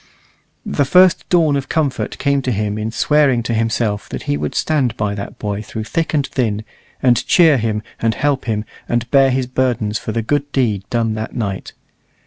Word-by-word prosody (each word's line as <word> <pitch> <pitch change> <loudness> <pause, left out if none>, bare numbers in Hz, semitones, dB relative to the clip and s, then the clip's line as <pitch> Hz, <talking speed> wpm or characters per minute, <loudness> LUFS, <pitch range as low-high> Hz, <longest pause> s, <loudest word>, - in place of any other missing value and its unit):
The 145 - +1
first 180 +6 +4
dawn 160 -5 +3
of 135 -1 -3
comfort 150 -5 -1
came 140 -1 +1
to 130 - -2
him 105 -1 -1
in 110 +1 -2
swearing 135 0 +2
to 115 - -2
himself 110 -2 -1
that - - -5
he 70 - -1
would 75 0 -3
stand 140 -8 0
by 105 -1 -1
that 100 -1 -7
boy 105 -1 -3
through 110 +1 -6
thick 165 +9 -2
and 145 -2 +2
thin, 110 -6 -2 0.4
and 125 -2 +4
cheer 160 -6 +5
him, 110 -1 -1 0.2
and 115 -1 +1
help 145 -2 0
him, 110 -2 -1 0.2
and 120 0 0
bear 135 -1 +5
his 130 0 0
burdens 125 -5 -1
for 110 - -5
the 115 +1 -2
good 145 +4 -1
deed 105 -8 0
done 115 -2 0
that 110 0 -5
night. 100 -5 -4
120 Hz, 195 wpm, -18 LUFS, 110-140 Hz, 0.4 s, cheer